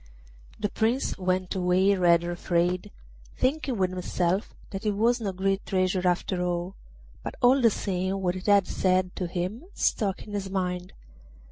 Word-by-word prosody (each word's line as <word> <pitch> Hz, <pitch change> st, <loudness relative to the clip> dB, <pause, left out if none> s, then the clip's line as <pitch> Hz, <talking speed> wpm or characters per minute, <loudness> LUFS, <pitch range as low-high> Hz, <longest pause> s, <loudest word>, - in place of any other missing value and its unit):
The 210 Hz, -1 st, -1 dB
Prince 230 Hz, +4 st, 0 dB
went 185 Hz, 0 st, 0 dB
away 185 Hz, +1 st, +3 dB
rather 175 Hz, -2 st, +3 dB
afraid, 175 Hz, +1 st, 0 dB, 0.5 s
thinking 270 Hz, -2 st, 0 dB
with 185 Hz, -1 st, +1 dB
himself 185 Hz, +1 st, -1 dB, 0.2 s
that 195 Hz, +1 st, -5 dB
it 210 Hz, -1 st, +1 dB
was 235 Hz, +4 st, +2 dB
no 200 Hz, -3 st, -1 dB
great 195 Hz, +1 st, 0 dB
treasure 185 Hz, -1 st, +1 dB
after 180 Hz, +1 st, 0 dB
all; 175 Hz, +1 st, -2 dB, 0.5 s
but -, -, -6 dB
all 260 Hz, +1 st, +5 dB
the 230 Hz, -, +6 dB
same 190 Hz, -1 st, -2 dB
what 180 Hz, -1 st, 0 dB
it 185 Hz, -, -7 dB
had 200 Hz, -2 st, +5 dB
said 185 Hz, 0 st, +1 dB
to 180 Hz, -, -2 dB
him 180 Hz, -, -3 dB
stuck 195 Hz, -4 st, 0 dB
in 210 Hz, -, -10 dB
his 195 Hz, -2 st, -3 dB
mind. 180 Hz, -1 st, -2 dB
185 Hz, 160 wpm, -27 LUFS, 180-205 Hz, 0.5 s, the